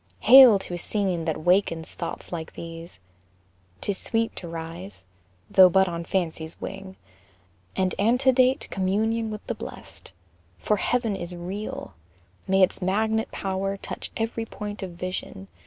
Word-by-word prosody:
Hail 250 -2 +9
to 190 - -5
a 175 - -3
scene 185 -3 -1
that 155 -1 -2
wakens 175 -3 +1
thoughts - - -6
like 165 -2 -5
these. 165 0 -9 0.8
'Tis 200 -2 -2
sweet 225 0 0
to 175 - -6
rise, 165 - -8 0.4
though 185 +6 +7
but 190 +1 +4
on 170 -1 -4
fancy's 165 -3 -2
wing, 190 -1 -7 0.8
And 185 -1 +1
antedate 255 +4 +3
communion 220 +4 0
with 215 -1 -7
the - - -2
blest, 65 0 -10 0.5
For 210 - 0
Heaven 235 -1 0
is 175 -1 -6
real! 185 +5 -6 0.5
May 190 0 +4
its 185 - +1
magnet 220 +4 0
power 195 0 -2
Touch - - -6
every 225 0 -2
point 210 -1 -7
of 190 - -4
vision! 170 - -6
190 Hz, 140 wpm, -25 LUFS, 175-215 Hz, 0.8 s, Hail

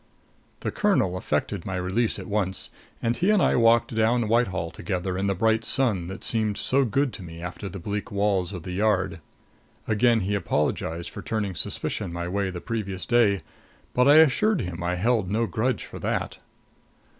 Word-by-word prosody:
The - - -2
colonel 195 - +2
effected 85 +2 -2
my 95 - -4
release 95 +6 0
at 95 - -7
once; 100 -1 -2 0.3
and 115 0 +1
he 180 +9 +1
and 210 -1 +5
I - - +3
walked 115 0 +4
down 110 +1 +2
Whitehall 95 -7 +1
together 90 +2 -3
in 95 +1 -1
the 100 - +1
bright 110 +3 +2
sun 110 -10 0
that 95 +2 -7
seemed 110 -3 0
so 135 +1 +2
good 135 +3 0
to 110 - -8
me 85 -2 -9
after 90 +3 -6
the 100 - -7
bleak 100 +3 -4
walls 100 -3 +1
of 90 -5 -7
the 90 - -6
Yard. 95 -3 +1 0.7
Again 115 +1 +3
he 100 +2 -1
apologized 85 -2 -1
for - - -7
turning 105 -4 -2
suspicion 85 - -3
my 85 0 -4
way 100 +1 -1
the 90 -1 -5
previous 100 -5 -4
day; 115 -6 +3 0.5
but 125 +1 +4
I 145 - +8
assured 160 - +5
him 90 -4 -5
I 90 +1 0
held 105 0 +1
no 110 +3 +1
grudge 120 +4 -1
for - - -9
that. - - -2
100 Hz, 185 wpm, -25 LUFS, 90-115 Hz, 0.7 s, I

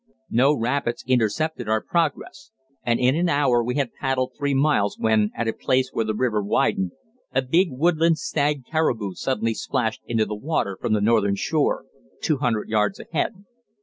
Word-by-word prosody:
No 135 +5 +4
rapids 120 0 -1
intercepted 125 +1 0
our 110 0 +3
progress, 155 -4 -2 0.3
and 120 -1 0
in 130 +2 +3
an 175 +2 +1
hour 135 -6 +3
we 125 +2 -2
had 140 -5 -1
paddled 130 -1 -1
three 145 -1 -1
miles, 135 -8 +2
when, 110 -1 +2
at 120 - -2
a 115 - 0
place 130 0 0
where 115 - 0
the 110 0 -2
river 110 -2 +1
widened, 95 -2 0 0.4
a 135 - +3
big 170 +9 +3
woodland 165 +4 +2
stag 145 -2 -1
caribou 120 - 0
suddenly 115 +1 -1
splashed 110 0 -2
into 115 -2 +1
the 105 - -5
water 105 -4 -2
from 110 - 0
the 105 - +2
northern 105 -2 +3
shore, 150 +8 0 0.3
two 155 - 0
hundred 120 -5 -1
yards 105 -2 0
ahead. 190 +5 -3
125 Hz, 175 wpm, -23 LUFS, 110-145 Hz, 0.4 s, No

